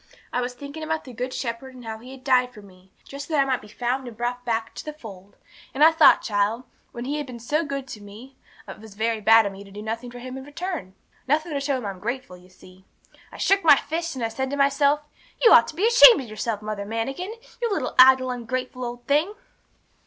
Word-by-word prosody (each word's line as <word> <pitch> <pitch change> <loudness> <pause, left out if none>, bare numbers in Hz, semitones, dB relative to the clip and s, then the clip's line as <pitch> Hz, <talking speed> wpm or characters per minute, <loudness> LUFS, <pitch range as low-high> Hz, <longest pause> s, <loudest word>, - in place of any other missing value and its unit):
I 250 - 0
was 250 0 -4
thinking 285 +4 -9
about 315 0 -2
the 255 - -11
Good 250 +3 -4
Shepherd, 255 +1 -5
and 250 -2 -12
how 220 -1 -6
He 245 +3 -13
had 265 -1 -12
died 255 -2 +2
for 210 - -12
me, 185 -1 -19
just 280 0 -9
that 310 -3 +1
I 275 - +4
might 260 -2 -1
be 210 - -14
found 245 +4 -3
and 230 -3 -10
brought 245 +1 -3
back 225 -1 -2
to - - -8
the 305 - -6
fold. 200 -9 -12 0.4
And 285 - +3
I 320 - +8
thought, 320 - +6
child, 210 +3 0 0.3
when 240 +1 -7
He 290 +3 -2
had 295 -2 -4
been 250 -2 -8
so 295 +8 -1
good 275 -3 -5
to 210 - -8
me, 220 +7 -13 0.3
it - - -9
was 215 -2 -13
very 225 +1 -1
bad 225 +1 +6
of 200 - -2
me 195 +1 -11
to 200 - -15
do 205 +2 -9
nothing 230 +3 -5
for 245 - -11
Him 255 +1 -8
in - - -10
return; 290 - -6 0.3
nothing 310 +3 0
to 280 - -1
show 275 -1 -1
Him 250 - -7
I'm 195 -2 -5
grateful, 235 -1 -5
you 180 +1 -18
see. 185 0 -18 0.5
I - - -11
shook 395 0 +2
my 305 -3 +8
fist, 330 +2 -3
and 245 -3 -2
I - - -2
said 265 +4 -3
to 285 - -3
myself, 280 +1 +3 0.4
You 465 - +6
ought - - +7
to - - -8
be 395 - +1
ashamed 475 0 +8
of 255 - -9
yourself, 215 0 -4
Mother 210 -1 -4
Manikin! 270 - -4 0.3
you 470 -2 0
little 320 -10 -2
idle, 260 0 +7
ungrateful 255 +1 -4
old 240 0 -6
thing! 310 +9 +1
250 Hz, 250 wpm, -24 LUFS, 220-280 Hz, 0.5 s, I